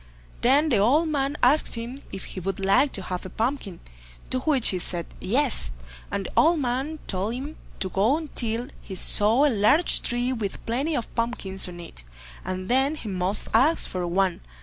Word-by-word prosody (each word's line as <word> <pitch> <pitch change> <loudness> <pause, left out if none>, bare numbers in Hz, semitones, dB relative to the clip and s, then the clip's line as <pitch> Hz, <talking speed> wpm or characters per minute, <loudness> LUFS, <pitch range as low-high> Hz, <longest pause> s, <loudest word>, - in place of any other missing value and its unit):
Then 280 +6 +4
the 230 -7 +3
old 290 +11 +3
man 285 -1 -1
asked 275 +3 +4
him 235 +4 -6
if 195 - -7
he - - -7
would 195 +2 -3
like 195 +9 +3
to 195 - -4
have 180 -1 -4
a 185 - -7
pumpkin, 225 -4 -3 0.5
to 255 - +1
which 270 -3 +3
he 185 - -1
said 175 -1 -2
"yes", 255 +6 +1 0.4
and 200 0 -3
the - - -6
old 330 0 +4
man 270 +4 -2
told 200 +4 -2
him 285 +5 -6 0.3
to 190 - +1
go 205 +8 +2
on 315 -1 -5
till 235 +1 -1
he 190 - -8
saw 220 +8 +5
a 295 - +3
large 225 - +3
tree 245 +2 0
with 210 -5 -5
plenty 275 +7 -1
of 235 - -4
pumpkins 215 -6 0
on 175 -1 -10
it, 165 - -10 0.4
and 185 0 -4
then 265 +4 +2
he 230 -8 -7
must 185 +2 -2
ask 270 +9 +3
for 180 -1 -3
one. 185 +1 0
230 Hz, 195 wpm, -25 LUFS, 195-275 Hz, 0.5 s, saw